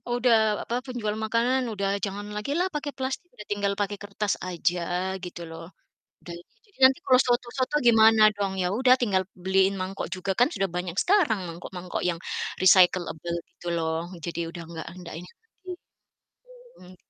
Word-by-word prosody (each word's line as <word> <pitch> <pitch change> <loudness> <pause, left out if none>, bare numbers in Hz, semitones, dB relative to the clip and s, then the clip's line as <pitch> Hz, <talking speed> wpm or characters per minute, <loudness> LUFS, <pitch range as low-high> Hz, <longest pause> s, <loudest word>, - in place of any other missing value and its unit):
Udah 245 -1 +4 0.3
apa, 235 - -3
penjual 230 -5 -3
makanan 235 +4 +1
udah 200 -1 -1 0.2
jangan 200 +1 -5
lagilah 290 - -1
pakai 290 -1 -3
plastik, 265 +7 -4
udah 210 - -11
tinggal 200 -1 0
pakai 205 0 -2
kertas 205 0 -1 0.2
aja, 175 0 0 0.4
gitu 175 -1 -8
loh. 165 0 -9 0.6
Udah 170 - -6 0.3
jadi 405 -9 -29
nanti 265 +3 +6
kalau 255 -5 +6
soto-soto 250 +3 0
gimana 225 -1 +6
dong? 200 -1 -2
Ya 180 - +1
udah, 255 +2 +5
tinggal 200 -7 +1 0.2
beliin 190 +1 +3
mangkok 190 +1 -4
juga 190 +1 -2
kan 245 - +5
sudah 195 -1 0
banyak 180 -1 -4
sekarang 355 - +3
mangkok-mangkok 175 +2 -6
yang 170 - -1 0.4
recyclable, 175 -2 +4
gitu 175 - -10
loh. 165 +1 -2
Jadi 170 0 -4
udah 170 0 -8
nggak 165 -1 -7 0.2
ndak 170 - -9
ini 180 - -13
lagi. 385 -4 -12 1.1
Hmm. 185 0 -14
205 Hz, 160 wpm, -26 LUFS, 180-245 Hz, 1.1 s, nanti